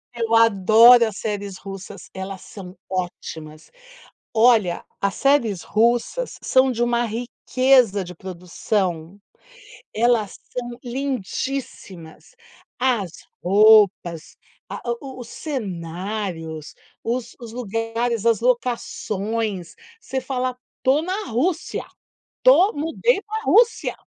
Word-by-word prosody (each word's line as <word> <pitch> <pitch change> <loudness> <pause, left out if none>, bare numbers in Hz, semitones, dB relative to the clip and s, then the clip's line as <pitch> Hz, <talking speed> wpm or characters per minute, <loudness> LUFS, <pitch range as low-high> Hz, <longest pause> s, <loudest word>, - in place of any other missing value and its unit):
Eu 230 -1 -2
adoro 230 +2 +7
as 215 -2 -5
séries 205 -3 -4
russas, 195 -1 -9
elas 190 0 -6
são 185 -3 -11
ótimas. 160 -4 -6 0.6
Olha, 220 -6 +3 0.2
as 200 0 0
séries 245 -10 +2
russas 235 - 0
são 260 0 +3
de 240 -1 -2
uma 240 0 +1
riqueza 240 -2 +2
de 180 +1 -9
produção, 180 0 -3 0.8
elas 225 -3 +2 0.2
são 240 -1 -5
lindíssimas, 255 - -5 0.4
as 235 -9 0 0.3
roupas, 200 -4 +4 0.3
a - - -5
a - - +2
o 265 -2 -9
os 235 - -9
cenários, 180 - -5 0.3
os 235 0 -3
os 230 -2 -9
lugares, 230 0 -2
as 230 -2 +3
locações, 225 -5 -2 0.3
você 265 -11 -3
fala 255 -1 -3 0.2
estou 270 +4 +2
na 380 +5 -3
Rússia, 320 +9 -1 0.6
tô 440 -5 +6
mudei 325 +9 0
pra 440 +1 -5
Rússia. 460 -1 +3
225 Hz, 105 wpm, -22 LUFS, 190-255 Hz, 0.8 s, adoro